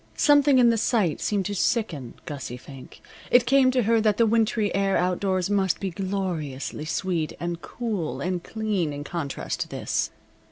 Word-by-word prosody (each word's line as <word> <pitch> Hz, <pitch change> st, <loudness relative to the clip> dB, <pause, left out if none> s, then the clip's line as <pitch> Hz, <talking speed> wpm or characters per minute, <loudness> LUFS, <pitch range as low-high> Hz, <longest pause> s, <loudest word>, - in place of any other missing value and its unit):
Something 290 Hz, -2 st, +5 dB
in 240 Hz, -2 st, +6 dB
the 230 Hz, -, +1 dB
sight 205 Hz, -, +1 dB
seemed 200 Hz, -3 st, 0 dB
to 205 Hz, -, -2 dB
sicken 175 Hz, -, -1 dB
Gussie 135 Hz, -4 st, -6 dB
Fink. 135 Hz, 0 st, -13 dB, 0.3 s
It 245 Hz, -1 st, +5 dB
came 270 Hz, 0 st, +5 dB
to 255 Hz, -1 st, +2 dB
her 225 Hz, +1 st, +3 dB
that 210 Hz, -2 st, +2 dB
the 230 Hz, -, +4 dB
wintry 220 Hz, -1 st, +1 dB
air 195 Hz, 0 st, +2 dB
outdoors 185 Hz, +1 st, 0 dB
must 195 Hz, -3 st, +1 dB
be 195 Hz, -2 st, -3 dB
gloriously 175 Hz, -7 st, -3 dB
sweet, 165 Hz, -1 st, -1 dB
and 170 Hz, 0 st, -4 dB
cool, 215 Hz, -9 st, -3 dB
and 180 Hz, -1 st, -2 dB
clean 210 Hz, -8 st, -2 dB
in 145 Hz, 0 st, -5 dB
contrast 150 Hz, -3 st, -4 dB
to -, -, -2 dB
this. -, -, -2 dB
195 Hz, 170 wpm, -25 LUFS, 165-225 Hz, 0.3 s, in